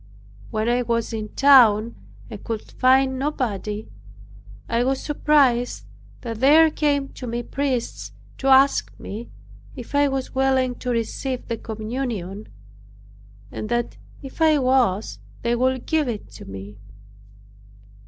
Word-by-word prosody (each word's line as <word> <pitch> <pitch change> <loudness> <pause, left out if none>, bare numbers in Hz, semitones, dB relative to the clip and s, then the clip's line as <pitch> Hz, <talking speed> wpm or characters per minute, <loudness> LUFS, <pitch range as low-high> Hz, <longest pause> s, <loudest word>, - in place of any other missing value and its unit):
When 215 +1 -2
I 245 +1 +2
was 230 -1 -1
in 215 -1 -4
town, 235 -5 +6 0.3
and 215 -4 -10
could 225 -2 -5
find 265 0 +3
nobody, 220 -7 -3 0.8
I 230 +1 +1
was 265 +1 0
surprised 280 -5 +1 0.4
that 230 -3 -6
there 310 +5 +6
came 285 -3 0
to 250 - -9
me 240 +1 -3
priests 265 -2 -3 0.3
to 270 - -2
ask 270 +1 +4
me 220 +4 -7 0.5
if 250 -1 -10
I 285 0 +4
was 270 -1 -3
willing 265 -1 +1
to 250 - -4
receive 245 +2 -2
the 230 - -3
communion, 215 -3 -5 1.0
and 215 - -6
that 240 0 -2 0.3
if 270 +4 -10
I 315 -1 +5
was 255 -7 +1 0.2
they 235 0 +1
would 255 +1 0
give 315 -3 +1
it 225 -4 -5
to - - -11
me. 100 +1 -9
245 Hz, 135 wpm, -22 LUFS, 225-270 Hz, 1.0 s, town